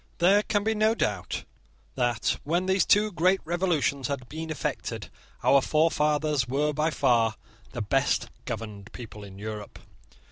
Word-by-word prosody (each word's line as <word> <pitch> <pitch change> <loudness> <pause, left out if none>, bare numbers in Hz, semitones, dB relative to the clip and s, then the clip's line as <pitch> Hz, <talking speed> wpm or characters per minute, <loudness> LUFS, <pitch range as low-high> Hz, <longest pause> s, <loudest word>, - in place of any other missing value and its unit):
There 195 +4 +5
can 205 -1 0
be 220 +1 +1
no 215 +1 +2
doubt 100 - -2 0.5
that, 120 -3 0
when 170 +5 0
these 190 0 +2
two 210 +1 +4
great 185 +2 +3
revolutions 165 -6 0
had 140 -3 -4
been 160 +3 -6
effected, 155 - -4 0.3
our 140 - +5
forefathers 150 -3 +2
were 145 +4 0
by 155 +2 +1
far 120 -7 +2 0.4
the - - -3
best - - +1
governed 105 -2 -6
people 110 -3 -9
in 95 -1 -11
Europe. 105 0 -7
150 Hz, 145 wpm, -27 LUFS, 120-175 Hz, 0.5 s, There